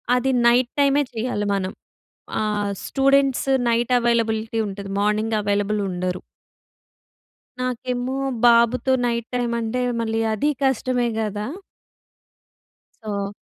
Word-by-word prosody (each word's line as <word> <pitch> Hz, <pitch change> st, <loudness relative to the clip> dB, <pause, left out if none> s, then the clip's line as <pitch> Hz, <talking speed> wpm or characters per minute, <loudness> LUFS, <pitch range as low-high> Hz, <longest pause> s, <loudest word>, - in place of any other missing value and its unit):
అది 255 Hz, +2 st, +1 dB, 0.2 s
నైట్ 245 Hz, +1 st, +3 dB
టైమే 280 Hz, +1 st, +4 dB
చేయాలి 225 Hz, -2 st, -2 dB
మనం. 190 Hz, -1 st, -2 dB, 0.7 s
ఆహ్, 210 Hz, -1 st, -1 dB, 0.2 s
స్టూడెంట్స్ 275 Hz, -1 st, +2 dB, 0.2 s
నైట్ 235 Hz, +1 st, +1 dB
అవైలబిలిటీ 225 Hz, -1 st, 0 dB
ఉంటది. 200 Hz, 0 st, -7 dB
మార్నింగ్ 215 Hz, +2 st, +1 dB
అవైలబుల్ 205 Hz, +1 st, 0 dB
ఉండరు. 180 Hz, 0 st, -3 dB, 1.4 s
నాకేమో 250 Hz, +1 st, -2 dB, 0.3 s
బాబుతో 235 Hz, +2 st, +4 dB
నైట్ 235 Hz, -1 st, -1 dB
టైమ్ 240 Hz, -1 st, 0 dB
అంటే 230 Hz, +2 st, -2 dB, 0.2 s
మళ్లీ 225 Hz, 0 st, -1 dB
అది 255 Hz, +8 st, +1 dB
కష్టమే 255 Hz, -2 st, +1 dB
గదా! 210 Hz, -1 st, -2 dB, 1.6 s
సో 200 Hz, -2 st, -3 dB
230 Hz, 105 wpm, -22 LUFS, 210-250 Hz, 1.6 s, టైమే